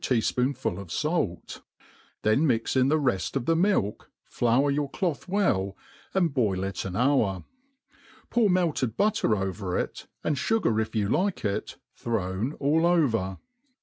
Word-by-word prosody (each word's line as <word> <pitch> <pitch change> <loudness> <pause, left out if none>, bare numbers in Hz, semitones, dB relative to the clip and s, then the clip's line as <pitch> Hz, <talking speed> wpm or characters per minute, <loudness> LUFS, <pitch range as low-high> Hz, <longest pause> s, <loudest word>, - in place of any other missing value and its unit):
tea«* 125 - +2
fpoonful 125 -5 0
of 100 -4 -9
fait} 150 - -2 0.6
then 110 +9 +3
mix 115 -2 0
in 130 0 +4
the 155 +3 +3
reft 120 - -1
of 135 -3 -1
the 165 - +3
milk, 170 - 0 0.2
flour 125 +4 +2
your 145 0 -1
cloth 175 -3 -2
well, 100 - 0 0.4
and 175 -6 +2
boil 100 -8 +1
it 95 -1 -3
an 95 -2 -4
hour; 115 -7 +2 0.9
pour 230 -4 +3
melted 165 - +1
butter 215 - +2
over^it, 95 -3 -2 0.2
and 150 - 0
fugar 130 - +1
if 110 - -5
you 105 -2 +1
like 185 - 0
it, 100 +1 -2 0.2
thrown 105 +3 -2
all 155 +4 +2
over. 115 - +1
125 Hz, 150 wpm, -27 LUFS, 100-160 Hz, 0.9 s, in